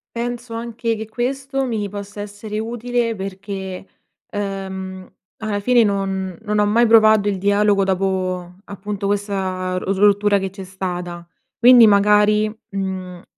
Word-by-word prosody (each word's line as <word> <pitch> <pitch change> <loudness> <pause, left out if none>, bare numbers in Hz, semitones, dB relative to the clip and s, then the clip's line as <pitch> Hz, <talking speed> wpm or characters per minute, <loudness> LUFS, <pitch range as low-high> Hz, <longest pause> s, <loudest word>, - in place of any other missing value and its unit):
Penso 240 0 -4
anche 230 0 -3
che 220 0 -7
questo 270 +3 -2
mi 215 -5 -2
possa 205 +1 -7
essere 210 +1 -6
utile 235 0 -2
perché, 190 -1 -6 0.5
uhm, 190 -2 -5 0.3
alla 215 -2 -2
fine 240 +2 +4
non 195 -3 -2
non 210 -1 0
ho 210 - +3
mai 230 +3 +4
provato 220 -2 +5
il 195 -2 -1
dialogo 205 0 +3
dopo, 185 -2 -1
appunto, 200 0 -5
questa 190 -3 -2
ros 190 +1 -2
rottura 205 0 +4
che 195 -1 -3
c'è 195 0 -9
stata. 180 -2 -5 0.3
Quindi 240 -2 +8
magari, 210 +1 +4 0.2
mhmm, 190 -2 -5
205 Hz, 135 wpm, -20 LUFS, 190-220 Hz, 0.5 s, Quindi